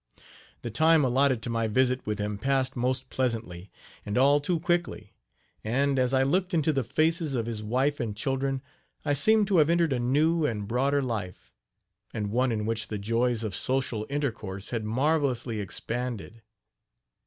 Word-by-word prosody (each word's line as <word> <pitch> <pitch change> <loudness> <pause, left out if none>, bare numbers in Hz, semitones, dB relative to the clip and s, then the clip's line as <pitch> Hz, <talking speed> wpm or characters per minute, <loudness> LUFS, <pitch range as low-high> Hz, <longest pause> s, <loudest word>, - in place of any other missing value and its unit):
The 120 - -4
time 160 +6 +4
allotted 130 -1 +2
to 120 - -3
my 115 -1 0
visit 130 +2 +1
with 105 -1 -1
him 105 0 -3
passed 135 +2 0
most 130 +1 -1
pleasantly, 110 -8 -3 0.3
and 105 +2 -3
all 140 +3 +5
too 165 +3 -1
quickly; 175 - -2 0.5
and, 135 +5 +1
as 125 -1 +2
I 135 0 +3
looked 180 +6 +1
into 155 -1 +2
the 135 -2 0
faces 160 - 0
of 115 -2 -1
his 115 -2 -4
wife 130 +7 0
and 110 -5 -3
children, 135 +2 -1 0.4
I 145 - +2
seemed 215 +9 +4
to 190 - +3
have 155 -1 +5
entered 170 -3 +2
a 125 - -1
new 155 +7 +2
and 105 -8 -1
broader 135 +5 +1
life, 105 -8 -5 0.6
and 105 -2 -2
one 125 +2 +2
in 105 -2 -2
which 110 -1 -1
the 105 - -4
joys 115 +3 0
of 105 -3 -3
social 125 -2 -1
intercourse 110 -9 -3
had 115 -3 -2
marvelously 130 -2 0
expanded. 115 +2 -5
130 Hz, 170 wpm, -27 LUFS, 110-140 Hz, 0.6 s, all